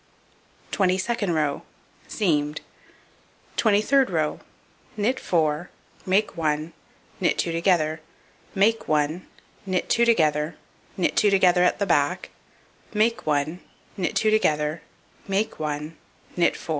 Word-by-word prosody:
Twenty 185 Hz, -2 st, +2 dB
second 205 Hz, -3 st, -1 dB
row: 150 Hz, -2 st, 0 dB, 0.5 s
Seamed. 150 Hz, -7 st, 0 dB, 0.9 s
Twenty 210 Hz, -2 st, +3 dB
third 270 Hz, +2 st, +3 dB
row: 155 Hz, -4 st, -1 dB, 0.6 s
Knit 245 Hz, +6 st, 0 dB
4, 160 Hz, 0 st, 0 dB, 0.4 s
make 195 Hz, +3 st, +1 dB
1, 155 Hz, 0 st, -1 dB, 0.5 s
knit -, -, +1 dB
2 170 Hz, -, 0 dB
together, 165 Hz, -2 st, +1 dB, 0.5 s
make 220 Hz, +4 st, +2 dB
1, 155 Hz, +3 st, 0 dB, 0.4 s
knit 185 Hz, -1 st, -1 dB
2 235 Hz, -, +4 dB
together, 155 Hz, -8 st, +2 dB, 0.4 s
knit 180 Hz, -, 0 dB
2 210 Hz, -, +4 dB
together 185 Hz, -2 st, +4 dB
at 180 Hz, -, +2 dB
the 200 Hz, -, 0 dB
back, 170 Hz, +1 st, 0 dB, 0.6 s
make 220 Hz, -1 st, +1 dB
1, 150 Hz, +3 st, 0 dB, 0.4 s
knit 185 Hz, -, -2 dB
2 215 Hz, -, +2 dB
together, 155 Hz, -6 st, +1 dB, 0.5 s
make 200 Hz, +3 st, -1 dB
1, 150 Hz, +1 st, -4 dB, 0.4 s
knit 175 Hz, -1 st, +2 dB
4. -, -, -13 dB
175 Hz, 120 wpm, -24 LUFS, 155-205 Hz, 0.9 s, 2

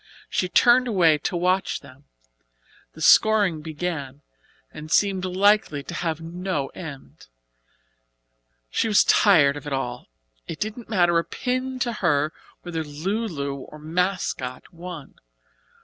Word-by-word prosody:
She 180 Hz, -, 0 dB
turned 245 Hz, +6 st, +5 dB
away 170 Hz, -9 st, +3 dB
to 175 Hz, -, -2 dB
watch 185 Hz, +2 st, 0 dB
them. 130 Hz, +3 st, -16 dB, 0.9 s
The 160 Hz, -, -7 dB
scoring 205 Hz, -5 st, +5 dB
began, 150 Hz, -3 st, -5 dB, 0.5 s
and 155 Hz, +1 st, -9 dB
seemed 195 Hz, -1 st, +2 dB
likely 185 Hz, -5 st, +2 dB
to 175 Hz, -, -8 dB
have 165 Hz, -2 st, -2 dB
no 170 Hz, -3 st, -3 dB
end. 150 Hz, -, -10 dB, 1.4 s
She -, -, +1 dB
was 210 Hz, -2 st, +5 dB
tired 155 Hz, -9 st, +5 dB
of 145 Hz, -, -9 dB
it 145 Hz, -, -3 dB
all. 125 Hz, -2 st, -4 dB, 0.4 s
It 160 Hz, -, -6 dB
didn't 215 Hz, +2 st, -5 dB
matter 175 Hz, -5 st, +3 dB
a -, -, -1 dB
pin 255 Hz, -, -3 dB
to 240 Hz, -1 st, 0 dB
her 155 Hz, -6 st, +1 dB, 0.3 s
whether 165 Hz, -2 st, -4 dB
"Lu 185 Hz, +10 st, -3 dB
Lu" 140 Hz, -7 st, -4 dB, 0.2 s
or 150 Hz, -, -11 dB
"Mascot" 160 Hz, -5 st, -3 dB
won. 170 Hz, -4 st, -9 dB
175 Hz, 135 wpm, -24 LUFS, 150-195 Hz, 1.4 s, turned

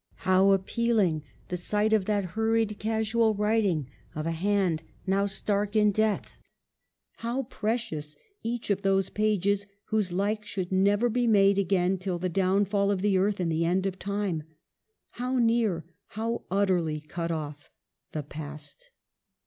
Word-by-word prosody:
How 185 Hz, +1 st, +5 dB
appealing 195 Hz, -4 st, +1 dB, 0.3 s
the 180 Hz, -, -2 dB
sight 210 Hz, +4 st, +1 dB
of 210 Hz, -3 st, +3 dB
that 205 Hz, -1 st, +1 dB
hurried, 225 Hz, -1 st, +1 dB
casual 220 Hz, 0 st, +1 dB
writing 205 Hz, -, +1 dB, 0.3 s
of 155 Hz, 0 st, -3 dB
a 165 Hz, -, 0 dB
hand 180 Hz, -1 st, +1 dB, 0.2 s
now 195 Hz, +1 st, +2 dB
stark 205 Hz, +1 st, -1 dB
in 210 Hz, -1 st, +5 dB
death! 215 Hz, 0 st, -1 dB, 0.8 s
How 240 Hz, +4 st, -2 dB
precious 220 Hz, -, -3 dB, 0.3 s
each 230 Hz, -2 st, -3 dB
of 200 Hz, 0 st, 0 dB
those 195 Hz, -1 st, +1 dB
pages 205 Hz, -1 st, +1 dB, 0.2 s
whose 210 Hz, -4 st, 0 dB
like 205 Hz, +4 st, 0 dB
should 195 Hz, -3 st, -4 dB
never 200 Hz, +4 st, +3 dB
be 240 Hz, +1 st, +1 dB
made 200 Hz, -2 st, +5 dB
again 185 Hz, 0 st, +1 dB
till 185 Hz, -1 st, -2 dB
the 180 Hz, +1 st, -2 dB
downfall 200 Hz, +2 st, +2 dB
of 200 Hz, -2 st, 0 dB
the 200 Hz, -2 st, +3 dB
earth 200 Hz, +1 st, +1 dB
in 175 Hz, -2 st, 0 dB
the 165 Hz, +1 st, +1 dB
end 185 Hz, +3 st, +1 dB
of 190 Hz, -1 st, -3 dB
time! 200 Hz, -5 st, -2 dB, 0.8 s
How 255 Hz, +1 st, 0 dB
near, 225 Hz, -8 st, +2 dB, 0.3 s
how 230 Hz, +1 st, -2 dB
utterly 180 Hz, -6 st, +1 dB
cut 165 Hz, +3 st, -5 dB
off, 150 Hz, -3 st, -5 dB, 0.4 s
the 155 Hz, -, -3 dB
Past 150 Hz, -, -10 dB
200 Hz, 150 wpm, -28 LUFS, 180-215 Hz, 0.8 s, How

